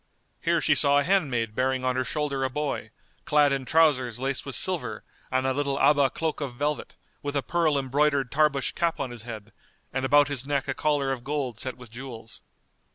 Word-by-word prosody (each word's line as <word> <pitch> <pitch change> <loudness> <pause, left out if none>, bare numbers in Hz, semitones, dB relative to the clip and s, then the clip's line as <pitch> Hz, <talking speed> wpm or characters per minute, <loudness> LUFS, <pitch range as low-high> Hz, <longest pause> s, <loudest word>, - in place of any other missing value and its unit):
Here - - +2
she - - +4
saw 140 0 +4
a 145 - +3
handmaid 135 - +1
bearing 130 +1 0
on 130 0 +1
her 130 - +1
shoulder 140 0 -2
a 130 - +1
boy, 150 +2 -3 0.3
clad 150 -1 +4
in 135 -1 -2
trousers 135 -6 +3
laced 135 +2 -2
with 135 - -2
silver 135 - -2 0.3
and 130 0 0
a 130 - +2
little 140 0 -1
Abá 140 -2 +4
cloak 160 -2 -2
of 135 -4 -4
velvet, 145 +3 -2 0.3
with 145 0 -3
a 140 - +1
pearl 165 -4 +1
embroidered 140 0 +1
Tarbush 145 -2 +2
cap 170 -1 -1
on 130 - -3
his 120 -2 -8
head, 110 -2 -9 0.4
and 130 0 -1
about 145 +2 +5
his 140 -2 -2
neck 140 -2 0
a 135 - 0
collar 145 -2 0
of 125 -3 -4
gold 135 -5 -3
set 130 +1 -4
with 125 -3 -13
jewels. 115 -2 -8
135 Hz, 205 wpm, -26 LUFS, 130-145 Hz, 0.4 s, about